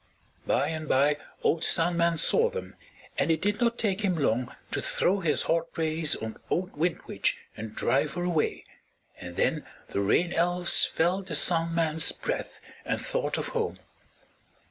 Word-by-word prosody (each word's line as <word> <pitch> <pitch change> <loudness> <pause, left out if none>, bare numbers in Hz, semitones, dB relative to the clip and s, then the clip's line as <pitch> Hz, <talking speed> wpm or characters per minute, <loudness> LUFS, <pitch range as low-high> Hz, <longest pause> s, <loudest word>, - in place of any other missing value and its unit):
By 145 - +1
and 155 -1 -5
by 145 +2 +3 0.3
old 165 - +1
Sun 170 +1 +3
Man 170 -1 +2
saw 465 - +4
them, 475 -1 -7 0.4
and - - +1
it 160 -1 +2
did 205 +5 -1
not 235 0 +2
take 200 -2 0
him 185 -4 0
long 125 -4 0 0.2
to - - -1
throw 195 +2 +1
his 165 -5 +1
hot 165 0 0
rays 160 -1 +2
on 110 0 -6
old 185 +1 -2
Wind 165 +3 -1
Witch - - -1 0.2
and 110 0 -8
drive 140 +2 +1
her 175 - -2
away, 170 -4 -1 0.5
and 90 0 -9
then - - 0 0.3
the 100 - -1
Rain 170 - +2
Elves 175 +1 +4
felt 185 +4 0
the 165 - -2
Sun 165 +1 +3
Man's 160 -1 +3
breath - - -5 0.2
and - - -2
thought - - -2
of - - -3
home. 460 -2 -2
165 Hz, 170 wpm, -27 LUFS, 155-185 Hz, 0.5 s, saw